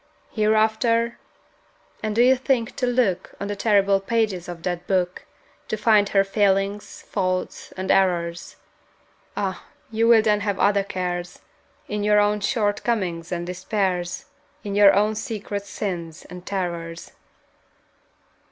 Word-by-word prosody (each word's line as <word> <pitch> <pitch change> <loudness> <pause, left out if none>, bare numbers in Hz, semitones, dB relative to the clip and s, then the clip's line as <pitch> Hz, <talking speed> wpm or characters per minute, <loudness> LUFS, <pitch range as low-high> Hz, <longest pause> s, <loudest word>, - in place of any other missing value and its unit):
Hereafter? 220 +2 +2 0.8
And 215 -1 -2
do 235 - +5
you 260 +1 +6
think 255 -3 -1
to 250 - 0
look 235 -7 0
On 200 - -3
the 205 - -3
terrible 200 -2 +3
pages 195 -4 -1
of 170 -1 -8
that 175 -1 -3
Book 185 -2 -1 0.4
To 215 - -2
find 210 -2 +4
her 195 -1 +4
failings, 195 0 0
faults, 185 -2 -3
and 185 0 -1
errors? 175 -1 +1 0.8
Ah, 190 -2 -2 0.3
you 225 +1 +2
will 230 -2 +6
then 210 -1 +3
have 205 -1 -2
other 200 0 +3
cares, 180 -3 -4 0.5
In 210 0 -3
your 210 0 +4
own 210 0 +2
short 205 0 0
comings 180 -8 -2
and 175 -1 -2
despairs, 180 -1 -2 0.4
In 205 - -4
your 205 -1 +7
own 210 +2 +2
secret 210 -3 -5
sins 175 -5 -5
and 180 0 -11
terrors! 170 -3 -4
200 Hz, 135 wpm, -23 LUFS, 185-215 Hz, 0.8 s, your